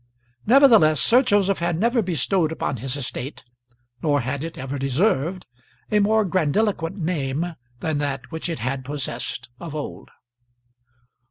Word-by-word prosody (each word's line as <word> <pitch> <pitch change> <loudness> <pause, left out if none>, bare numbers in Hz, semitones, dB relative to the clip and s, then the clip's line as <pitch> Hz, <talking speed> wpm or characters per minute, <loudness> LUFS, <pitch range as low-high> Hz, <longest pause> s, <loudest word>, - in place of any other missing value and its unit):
Nevertheless, 225 - +6
Sir 245 +3 +5
Joseph 205 -6 +2
had 170 -1 0
never 235 +3 +2
bestowed 175 -1 0
upon 140 -4 -2
his 130 +3 -3
estate, 135 0 -6 0.6
nor 145 -3 +2
had 135 +4 -3
it 165 0 -6
ever 135 +1 -4
deserved, 155 - 0 0.5
a 210 - +4
more 215 +1 +3
grandiloquent 185 +1 0
name 160 -1 -2 0.3
than 155 -2 -1
that 135 -2 -3
which 160 +1 -3
it 165 - -2
had 130 +2 -3
possessed 130 -4 -4
of 165 -3 -7
old. 150 - -6
160 Hz, 140 wpm, -23 LUFS, 135-195 Hz, 0.6 s, Nevertheless